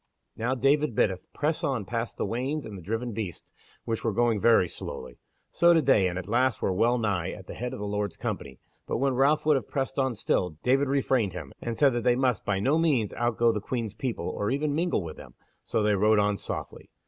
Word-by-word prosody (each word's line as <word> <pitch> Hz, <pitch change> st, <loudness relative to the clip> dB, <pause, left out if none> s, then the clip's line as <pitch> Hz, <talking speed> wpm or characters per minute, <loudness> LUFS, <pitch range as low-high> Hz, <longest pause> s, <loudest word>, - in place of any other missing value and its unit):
Now 120 Hz, +4 st, -1 dB
David 140 Hz, 0 st, +2 dB
biddeth 95 Hz, -4 st, 0 dB
press 160 Hz, +3 st, -1 dB
on 130 Hz, -9 st, -1 dB
past 115 Hz, +2 st, -3 dB
the -, -, -1 dB
wains 135 Hz, +6 st, -2 dB
and 110 Hz, -, -8 dB
the 95 Hz, -, -8 dB
driven 115 Hz, +7 st, -3 dB
beasts, 100 Hz, -7 st, -6 dB, 0.3 s
which 115 Hz, -1 st, -2 dB
were 115 Hz, -, +1 dB
going 115 Hz, -1 st, +1 dB
very 115 Hz, -5 st, +5 dB
slowly. 65 Hz, -6 st, -8 dB, 0.3 s
So 170 Hz, +1 st, +5 dB
did 160 Hz, -4 st, +2 dB
they, 105 Hz, -8 st, +5 dB
and 90 Hz, 0 st, -3 dB
at 95 Hz, -1 st, -5 dB
last 120 Hz, +2 st, +2 dB
were 95 Hz, -, 0 dB
well 120 Hz, +6 st, +2 dB
nigh 100 Hz, -6 st, -1 dB
at 95 Hz, -, -8 dB
the -, -, -8 dB
head 125 Hz, +1 st, -4 dB
of 130 Hz, -, -6 dB
the 105 Hz, -, -5 dB
Lord's 105 Hz, -2 st, -2 dB
company, 65 Hz, -2 st, -4 dB, 0.3 s
but -, -, -1 dB
when 135 Hz, +2 st, +1 dB
Ralph 140 Hz, +5 st, +3 dB
would 155 Hz, -2 st, +5 dB
have 125 Hz, -, -6 dB
pressed 135 Hz, 0 st, -2 dB
on 130 Hz, -3 st, +1 dB
still, 90 Hz, -6 st, -1 dB
David 135 Hz, +3 st, +3 dB
refrained 130 Hz, -7 st, +1 dB
him, 80 Hz, -6 st, -7 dB
and 115 Hz, -1 st, -4 dB
said 140 Hz, -3 st, +4 dB
that 120 Hz, -1 st, -1 dB
they 120 Hz, +1 st, +4 dB
must 125 Hz, -5 st, +1 dB
by 100 Hz, -2 st, 0 dB
no 140 Hz, +10 st, +2 dB
means 135 Hz, -11 st, +1 dB
outgo 120 Hz, 0 st, +2 dB
the 105 Hz, -2 st, -3 dB
Queen's 115 Hz, -2 st, -3 dB
people, 125 Hz, 0 st, -3 dB
or 105 Hz, -, -2 dB
even 145 Hz, +2 st, 0 dB
mingle 165 Hz, -, 0 dB
with 80 Hz, -2 st, -8 dB
them; -, -, -12 dB, 0.3 s
so 110 Hz, -, 0 dB
they 105 Hz, 0 st, +3 dB
rode 105 Hz, +2 st, +4 dB
on 105 Hz, 0 st, +2 dB
softly. -, -, -6 dB
115 Hz, 230 wpm, -27 LUFS, 105-135 Hz, 0.3 s, very